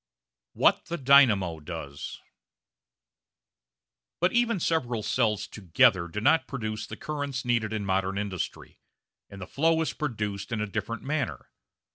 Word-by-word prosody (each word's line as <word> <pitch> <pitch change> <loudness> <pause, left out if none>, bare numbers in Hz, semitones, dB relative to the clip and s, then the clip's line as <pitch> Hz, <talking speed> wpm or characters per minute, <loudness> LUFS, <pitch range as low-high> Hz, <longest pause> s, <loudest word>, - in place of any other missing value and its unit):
What - - +3
the 170 +1 -4
Dynamo 115 - +5
does 75 -3 -7 2.0
But 180 +2 +2
even 235 -4 +2
several 125 -10 0
cells 110 -2 +1
together 90 -2 +2
do 95 +5 -4
not 150 +8 +3
produce 110 -5 -4
the - - -8
currents 145 -4 -4
needed 115 -3 +1
in 110 -2 -3
modern 95 0 0
industry, 100 -3 -5 0.5
and 100 - -10
the 95 - -6
flow 160 - +1
is 160 - -1
produced 105 -8 -4
in 115 - -1
a 105 - 0
different 110 +2 -4
manner. 135 - -3
110 Hz, 135 wpm, -27 LUFS, 100-140 Hz, 2.0 s, Dynamo